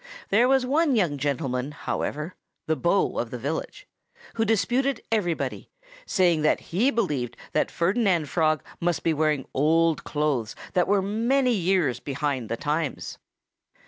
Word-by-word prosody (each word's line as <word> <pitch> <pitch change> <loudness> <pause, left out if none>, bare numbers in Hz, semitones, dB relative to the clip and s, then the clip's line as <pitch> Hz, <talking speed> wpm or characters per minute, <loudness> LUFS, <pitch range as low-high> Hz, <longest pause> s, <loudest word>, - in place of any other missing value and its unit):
There 230 +5 +4
was 265 -1 +3
one 290 +1 +2
young 170 -10 +1
gentleman, 135 -1 -2
however 150 +3 -3 0.3
the 160 - +1
beau 170 +7 +1
of - - -2
the - - -5
village - - -5 0.5
who 225 - 0
disputed 240 +4 +1
everybody, 180 -7 -1 0.4
saying 175 -4 +3
that 155 - +3
he 225 +10 +3
believed 150 - -1
that - - +1
Ferdinand 180 -3 +1
Frog 155 0 +1 0.2
must 170 -3 0
be 165 - +2
wearing 150 -3 +1
old 160 +3 +2
clothes 145 -7 -1 0.2
that 180 -1 +2
were 200 -1 +2
many 240 +6 +1
years 180 - +1
behind 140 -4 -3
the 115 - -2
times. 150 +2 -3
170 Hz, 145 wpm, -25 LUFS, 150-215 Hz, 0.5 s, There